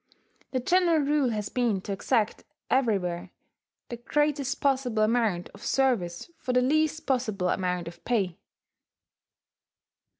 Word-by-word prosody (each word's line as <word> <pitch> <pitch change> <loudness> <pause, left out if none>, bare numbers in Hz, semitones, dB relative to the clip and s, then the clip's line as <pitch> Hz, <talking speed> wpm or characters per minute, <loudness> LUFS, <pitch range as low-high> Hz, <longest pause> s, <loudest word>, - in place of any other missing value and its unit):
The 255 - -1
general 345 +4 +3
rule 285 -2 +2
has 210 -3 -3
been 235 -6 +1
to 200 - -6
exact 210 +2 0 0.3
everywhere 195 -9 +1 0.6
the 240 - -5
greatest 285 +2 0
possible 260 -6 +1
amount 215 -6 +1
of 200 - -15
service 240 - 0
for 250 - -2
the 250 - +4
least 310 +3 +1
possible 215 -9 0
amount 180 -2 -1
of 170 0 -10
pay. 195 -8 0
240 Hz, 125 wpm, -27 LUFS, 195-270 Hz, 0.6 s, the